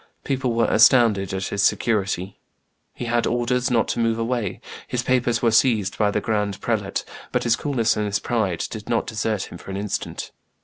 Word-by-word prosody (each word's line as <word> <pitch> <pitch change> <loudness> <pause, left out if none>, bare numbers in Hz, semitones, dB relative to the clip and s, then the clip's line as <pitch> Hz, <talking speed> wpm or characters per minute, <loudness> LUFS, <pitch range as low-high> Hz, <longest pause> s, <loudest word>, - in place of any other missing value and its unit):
People 130 -3 -1
were 115 0 +2
astounded 110 -4 +4
at 95 0 -3
his 100 - -1
security. 100 -3 0 0.5
He 120 - -6
had 120 0 +1
orders 120 +1 0
not 115 -3 +2
to - - -1
move 115 -1 +1
away; 115 -3 -2 0.3
his 125 -1 -2
papers 120 -2 +1
were 115 - +4
seized 110 -4 +3
by 105 -1 +3
the 105 - 0
grand 105 -2 -1
prelate; - - -2 0.3
but - - 0
his 120 -1 +3
coolness 120 -6 0
and 105 -1 -1
his 100 -1 0
pride 100 -8 -1
did 110 -2 -7
not 115 - +1
desert 110 -2 -2
him - - -9
for - - -12
an 95 - -4
instant. 100 -1 -4
115 Hz, 190 wpm, -23 LUFS, 105-120 Hz, 0.5 s, astounded